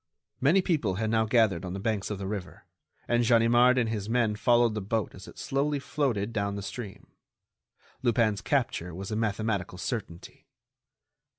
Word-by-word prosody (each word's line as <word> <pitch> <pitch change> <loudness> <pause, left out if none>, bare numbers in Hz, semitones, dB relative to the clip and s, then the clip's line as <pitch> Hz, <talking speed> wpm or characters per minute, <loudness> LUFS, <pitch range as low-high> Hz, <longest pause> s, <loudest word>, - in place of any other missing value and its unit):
Many 165 +8 +4
people 130 - 0
had 110 +2 -1
now 110 -1 +3
gathered 110 -6 +2
on 90 -1 -5
the 95 - -4
banks 105 -1 -1
of 105 - -3
the 95 - -5
river, 95 -2 -6 0.4
and 120 0 +2
Ganimard 120 +2 +5
and 120 -3 +2
his 110 -2 -3
men 115 -3 +2
followed 120 +1 +3
the 105 - -3
boat 105 +2 -2
as 95 - -12
it - - -13
slowly 145 +2 -1
floated 135 -6 -1
down 100 -2 -1
the 100 - -5
stream. 105 -1 -8 0.9
Lupin's 115 -5 +2
capture 115 - -1
was 95 +3 -6
a - - -1
mathematical 105 -4 -1
certainty. 90 -1 -6
110 Hz, 170 wpm, -28 LUFS, 100-120 Hz, 0.9 s, Ganimard